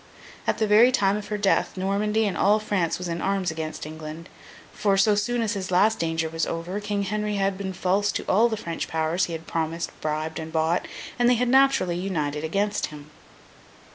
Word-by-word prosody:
At - - +1
the 220 - +1
very 215 +4 +6
time 200 -5 +2
of 210 -1 -5
her 210 - -2
death, 200 -1 +1
Normandy 210 +3 +1
and 200 - -1
all 205 +2 +4
France 200 -6 -1
was 180 0 -5
in 170 0 -3
arms 195 -3 0
against 160 -1 -5
England; 155 +2 -8 0.4
for, 200 -2 +1
so 210 +2 +4
soon 230 +4 0
as 220 0 -1
his 190 -3 -4
last 205 +5 +3
danger 165 -1 -1
was 165 0 -2
over, 170 +4 -3
King 205 -1 -2
Henry 210 +1 -2
had 195 -1 0
been 190 0 -4
false 190 +3 +1
to - - -3
all 225 +5 +4
the 220 - -2
French 170 -4 -4
powers 160 +3 0
he 170 - -6
had 165 0 -6
promised, 165 +1 -2
bribed, 155 +1 -2
and 160 0 -6
bought, 160 +2 0 0.3
and 240 0 +4
they 250 - +5
had 245 +1 0
naturally 265 -10 +4
united 155 -6 -2
against 200 +6 0
him. 150 0 -12
190 Hz, 205 wpm, -25 LUFS, 165-210 Hz, 0.4 s, very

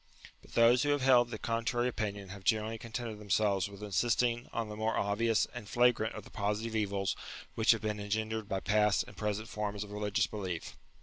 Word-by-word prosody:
But - - -18
those 120 +1 +6
who 145 - +1
have 145 -2 +2
held 125 -2 +5
the 110 - -5
contrary 115 +2 0
opinion 100 -5 -3
have 100 0 -9
generally 110 +1 +1
contented 115 -1 -5
them 105 -1 -12
selves 100 -1 +2
with 100 +1 -10
insisting 120 +3 +1
on 115 -1 -2
the 105 - -6
more 110 +1 0
obvious 110 +2 +2
and 120 -4 -8
flagrant 120 -2 +3
of 110 - -7
the - - -15
positive 105 +2 -2
evils 100 -3 0 0.4
which 110 - -1
have 115 - +6
been 105 -1 -2
engen 110 +2 -2
dered 110 -2 -3
by 95 -1 -2
past 105 -1 +3
and - - -12
present 105 +1 -2
forms 105 -1 -3
of 105 - -10
religious 105 -1 0
belief. 95 -6 -5
110 Hz, 205 wpm, -32 LUFS, 100-115 Hz, 0.4 s, those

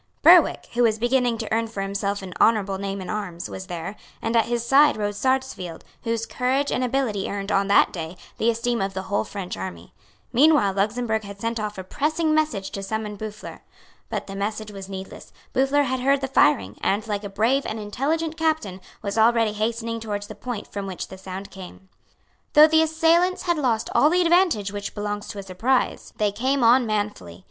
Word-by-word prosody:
Berwick, - - +6
who 240 - +1
was 225 -2 +3
beginning 245 0 +1
to - - -4
earn 225 0 +1
for 220 -3 -5
himself 200 0 -2
an 185 -1 -7
honourable 200 -4 +3
name 195 0 -4
in 185 - -7
arms, 190 -5 -4
was 190 0 -7
there; 175 +2 -5 0.2
and 225 +1 -2
at 230 - +4
his 235 0 -1
side 280 +2 +5
rode 205 -1 -1
Sarsfield, 260 -8 -2 0.2
whose 230 -1 -2
courage 265 +4 0
and 255 - 0
ability 245 -6 -1
earned, 200 0 -4
on 195 0 +2
that 200 - +4
day, 165 0 -6 0.2
the 225 - +3
esteem 235 0 0
of 195 0 -2
the 190 - -3
whole 200 +1 -1
French 195 -3 -6
army. 90 -2 -7 0.4
Meanwhile 275 -6 +5
Luxemburg 220 +2 0
had 200 -1 -9
sent 230 +1 -2
off 210 -1 -4
a 190 - -5
pressing 310 - 0
message 305 -11 0
to 195 - -5
summon 210 +1 -4
Boufflers. 210 0 -8 0.5
But - - -3
the 195 - -8
message 210 +2 -3
was 195 -1 -9
needless. 190 0 -8 0.2
Boufflers 270 +2 +3
had 260 0 -1
heard 275 +2 +2
the 270 - -1
firing, 105 - +2
and, 205 +3 0
like 210 -2 -3
a 200 - -5
brave 230 +8 +1
and 220 - -4
intelligent 305 +10 -2
captain, 310 - -1 0.2
was 200 +2 -2
already 225 -1 +4
hastening 230 +2 -2
towards 205 -2 -4
the 215 - -9
point 220 +1 -6
from 200 -1 -6
which 185 -2 -6
the 190 - -9
sound 190 +1 -7
came. 190 0 -11 0.6
Though 300 0 +9
the 320 0 +4
assailants 330 +3 +2
had 345 -3 0
lost 235 -5 0
all 300 - +5
the 360 +2 +3
advantage 335 - +3
which 205 0 -6
belongs 205 0 -3
to - - -7
a 200 - -5
surprise, 225 +8 0
they 210 -1 +1
came 260 +5 0
on 240 +1 +5
manfully. 205 - -3
215 Hz, 200 wpm, -24 LUFS, 195-255 Hz, 0.6 s, Though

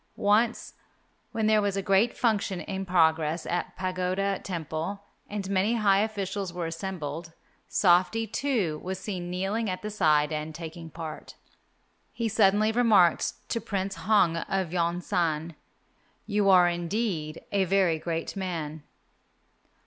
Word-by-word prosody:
Once, 220 +3 +1 0.6
when 220 -1 -1
there 215 0 +4
was 200 -1 -1
a - - 0
great 195 +5 +2
function 205 -5 +1
in 195 -1 -5
progress 160 -2 +2
at 175 - -3
Pagoda 185 +1 -1
Temple 170 +3 -4 0.3
and 205 -2 -4
many 200 +4 +1
high 200 -3 +4
officials 200 -3 -2
were 175 -1 -4
assembled, 165 -2 -5 0.3
Softy, 185 +5 +3
too, 220 - -1
was 190 +1 -3
seen 185 -3 -5
kneeling 195 +5 -1
at 185 +1 -4
the 210 - -4
side 155 -6 +3
and 155 0 -4
taking 165 0 -8
part. 160 -1 -8 0.8
He 230 - -2
suddenly 215 0 +3
remarked 220 -7 +3
to 230 - -1
Prince 195 -1 -2
Hong 190 -5 +2
of 180 0 -2
Yon 175 0 0
san, 165 -2 -1 0.7
"You 205 -2 +2
are 180 -2 +7
indeed 175 -2 -2
a 195 -1 +2
very 185 -3 +2
great 165 +2 -3
man." 165 -5 -4
185 Hz, 135 wpm, -27 LUFS, 165-205 Hz, 0.8 s, are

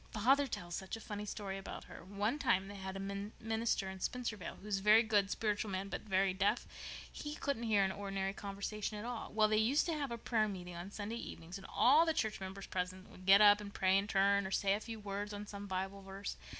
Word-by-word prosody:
Father 270 +6 +3
tells 175 -7 -5
such 190 +5 -4
a - - -10
funny 210 -1 -5
story 195 -2 -4
about 195 - -7
her. - - -11
One 205 - -1
time 215 -8 +2
they - - -7
had 190 -1 -5
a - - -5 0.4
minister 225 -2 0
in 190 0 -6
Spencervale 220 -3 -3
who - - -15
was 205 -2 0
a - - -9
very 215 +3 +7
good, 205 -3 +2
spiritual 210 0 -1
man 195 +1 -3
but - - -4
very 195 -2 +2
deaf. 200 +4 +1 0.5
He 295 0 -5
couldn't 280 -6 -2
hear 205 -2 +5
any 190 0 +1
ordinary 195 -1 -2
conversation 205 +1 -4
at 210 - -5
all. 240 -1 -4
Well, 215 0 +4
they 215 0 +2
used 245 +8 +3
to 340 - 0
have 290 -3 -2
a 235 - -3
prayer 220 -1 +1
meeting 180 -3 -6
on 175 +3 -6
Sunday 210 +2 -4
evenings, 175 -4 -7
and 190 - -11
all 310 +3 +6
the 325 - +3
church 220 -2 0
members 190 0 -6
present 185 +1 -4
would 185 +1 -13
get 195 +2 +9
up 205 0 +8
and 200 -1 -7
pray 190 -1 +3
in 195 +1 +2
turn, 200 -1 +3
or - - -5
say 195 0 +2
a 205 - 0
few 225 0 -7
words 205 0 -4
on 205 0 -5
some 200 0 -7
Bible 190 +1 -3
verse. 195 +1 -6
205 Hz, 240 wpm, -36 LUFS, 195-220 Hz, 0.5 s, get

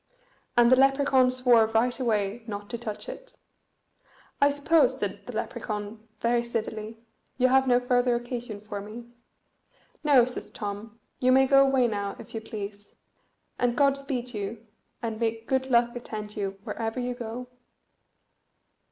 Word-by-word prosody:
And 240 0 +6
the - - +9
Lepracaun 270 -1 +4
swore 250 -3 +4
right 230 +4 +1
away 220 -2 0
not 205 -1 -6
to 235 - -3
touch 220 -3 -6
it. - - -10 1.0
"I 285 - +6
suppose," 290 +3 +3
said - - -4
the - - -6
Lepracaun, 215 +1 -5
very 235 0 +2
civilly, 225 -1 -4 0.4
"you 255 0 +4
have 265 +1 +4
no 245 -1 +5
further 245 0 +2
occasion 240 -3 -5
for 205 -1 -6
me?" 220 +4 -9 1.0
"No," 280 -5 +6
says 250 - -4
Tom; 210 +1 -6 0.2
"you 255 0 +3
may 265 +1 +6
go 275 +1 +6
away 265 -2 +3
now, 200 -2 -3
if - - -12
you 225 - -4
please, 205 -2 -8 0.6
and 245 -1 +1
God 280 -1 +4
speed 255 -3 -4
you, 210 +2 -5 0.4
and 225 -2 -3
may 225 -1 -1
good 265 +3 -1
luck 235 -1 +3
attend 215 -3 -6
you 195 -2 -3
wherever 225 +3 -3
you 250 0 -2
go." 245 +1 -6
235 Hz, 150 wpm, -27 LUFS, 215-255 Hz, 1.0 s, the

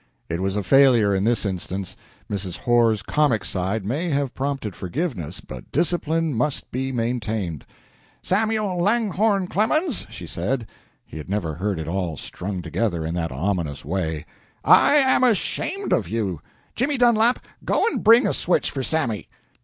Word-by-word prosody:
It 85 +2 -2
was 95 +1 -1
a 105 - -1
failure 125 -4 +5
in 95 +1 +1
this 115 -1 +1
instance. 95 0 -3 0.3
Mrs. 95 -3 -4
Horr's 115 -4 +2
comic 130 -6 +1
side 95 +3 -2
may 150 - -1
have 140 -3 -1
prompted 135 -7 -3
forgiveness, 105 - -4
but 65 -2 -10
discipline 165 0 0
must 125 +5 -2
be 130 +1 -2
maintained. 110 - -2 0.6
"Samuel 210 -2 0
Langhorne 205 -1 +2
Clemens," 230 - 0
she 90 - -8
said 110 +10 -2 0.4
(he 80 - -9
had 75 - -9
never 95 -6 -1
heard 95 +3 -2
it 80 - -5
all 85 -3 -2
strung 90 +4 -5
together 85 -1 -1
in 80 - -3
that 85 -2 -2
ominous 80 -1 -2
way), 80 -2 -2 0.4
"I - - +6
am 265 -3 +4
ashamed 255 - 0
of - - +1
you! 100 -8 -2 0.3
Jimmy 275 +4 0
Dunlap, 240 0 +3 0.2
go - - +1
and 465 - -1
bring 230 +3 +7
a - - +1
switch 175 - +1
for 135 - -3
Sammy." 130 -7 -1
115 Hz, 155 wpm, -23 LUFS, -, 0.6 s, bring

